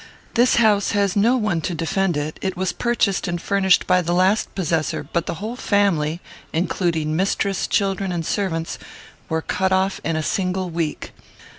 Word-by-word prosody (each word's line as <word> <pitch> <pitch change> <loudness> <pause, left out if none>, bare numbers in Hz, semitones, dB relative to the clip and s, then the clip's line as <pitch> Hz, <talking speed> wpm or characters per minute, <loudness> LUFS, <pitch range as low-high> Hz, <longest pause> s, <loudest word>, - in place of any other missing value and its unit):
This 245 +2 +4
house 210 -4 +3
has 200 -2 +1
no 230 +5 +4
one 210 -8 0
to 175 +2 -3
defend 170 +2 0
it. 150 +1 -4
It 190 -1 -2
was 185 0 0
purchased 230 -5 0
and 175 0 -2
furnished 190 0 +2
by 180 0 +3
the 175 0 -1
last 190 +4 +2
possessor; 165 -6 -1
but 165 +3 -2
the - - -2
whole 215 +8 -5
family, 180 -8 +1 0.3
including 165 -2 0
mistress, 195 +1 0
children, 195 -2 0
and 170 -2 -2
servants, 165 -5 -2 0.5
were 160 -1 -1
cut 190 0 0
off 190 +1 +1
in 165 +2 -1
a 155 - -1
single 185 +1 -1
week. 165 -2 -3
185 Hz, 170 wpm, -21 LUFS, 165-200 Hz, 0.5 s, This